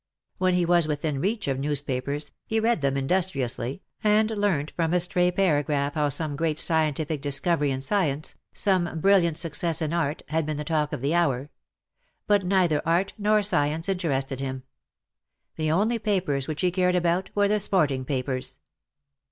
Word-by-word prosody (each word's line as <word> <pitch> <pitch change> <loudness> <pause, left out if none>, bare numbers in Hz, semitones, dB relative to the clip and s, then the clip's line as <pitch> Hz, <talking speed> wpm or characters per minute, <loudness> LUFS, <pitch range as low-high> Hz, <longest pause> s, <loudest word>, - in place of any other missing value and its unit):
When 185 -1 +2
he 180 -1 +2
was 170 -2 +3
within 150 -2 -2
reach 210 +3 -1
of 135 -1 -1
newspapers 145 0 -2 0.2
he 220 - 0
read 225 -5 +1
them 140 -1 0
industriously, 135 -3 -1 0.2
and 215 +1 +3
learnt 200 -9 0
from 165 0 0
a - - +4
stray 180 0 +1
paragraph 145 -6 +1
how 150 -2 +1
some 150 +1 -1
great 155 0 -1
scientific 155 -2 +1
discovery 145 +1 0
in 130 -1 -2
science, 155 -2 0 0.2
some 180 -5 0
brilliant 170 -3 +3
success 165 0 0
in 155 0 -2
art, 155 -3 -1
had 160 +1 0
been 155 -1 -2
the 150 - -3
talk 150 -1 -1
of - - -4
the 140 +4 0
hour; 145 -5 0 0.7
but 205 -2 +3
neither 180 -5 +2
art 170 +4 +1
nor 210 0 +3
science 160 -4 +1
interested 140 -8 -1
him. 130 -1 -4 0.9
The 155 -1 -1
only 215 +8 +1
papers 185 -11 -1
which 155 -1 -3
he 180 -1 +2
cared 180 0 +1
about 175 +1 +1
were 205 0 +3
the 210 +1 +1
sporting 155 -10 +1
papers. 130 -1 -3
160 Hz, 170 wpm, -25 LUFS, 145-185 Hz, 0.9 s, a